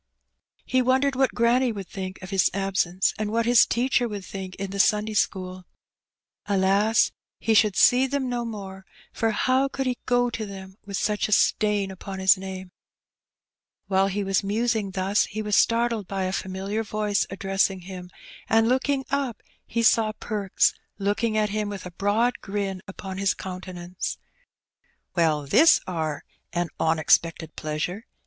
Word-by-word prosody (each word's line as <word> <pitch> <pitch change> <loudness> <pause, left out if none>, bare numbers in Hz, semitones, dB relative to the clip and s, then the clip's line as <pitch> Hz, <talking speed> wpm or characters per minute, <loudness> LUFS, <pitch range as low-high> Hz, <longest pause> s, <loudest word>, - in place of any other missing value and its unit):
He 255 - +2
wondered 260 +2 +2
what 265 0 +1
granny 240 +2 +3
would 200 -4 -6
think 185 -1 -6
of 185 - -8
his 190 -2 +3
absence, 195 -2 0
and 215 -1 -2
what 230 +1 +1
his 240 -1 +6
teacher 245 0 +1
would 205 -4 -6
think 190 -1 -7
in 195 -1 -5
the 200 - -5
Sunday 210 +2 +2
school. 185 -3 -2 0.8
AJas! 200 +3 +3 0.3
he 225 - +1
should 210 -2 +4
see 255 +2 +5
them 275 -1 -1
no 245 -1 -2
more, 195 -4 -7 0.3
for 225 - 0
how 255 +5 +2
could 270 0 -4
he 250 -1 -1
go 245 0 +2
to 230 - -4
them 190 -2 -9
with 200 -1 -3
such 210 -1 0
a - - -7
stain 210 -1 +2
upon 190 +1 -7
his 190 0 +5
name? 190 -1 -7 1.1
While 190 0 +2
he 200 +1 -2
was 195 0 +1
musing 220 0 0
thus 190 +2 +1
he 215 +1 -5
was 210 -1 0
startled 230 -3 +2
by 195 0 -2
a 185 0 -2
familiar 195 +3 -3
voice 210 -1 -1
addressing 195 0 0
him, 180 0 -9 0.4
and 225 +1 +4
looking 265 +2 +1
up 275 -4 -2 0.2
he 230 - -1
saw 225 -1 +4
Perks 205 -4 +1 0.2
looking 215 +3 0
at 210 -1 +2
him, 210 0 -2
with 200 -2 -7
a 180 - -7
broad 210 +7 +1
grin 195 -2 -3
upon 190 0 -7
his 195 -1 +1
countenance. 180 -1 -6 0.5
'* - - -45
Well, 155 -4 +2
this 320 - +6
are 160 -4 -3 0.3
a 175 0 0
onexpected 160 +1 +2
pleasure 155 +8 -4
200 Hz, 165 wpm, -25 LUFS, 190-225 Hz, 1.1 s, his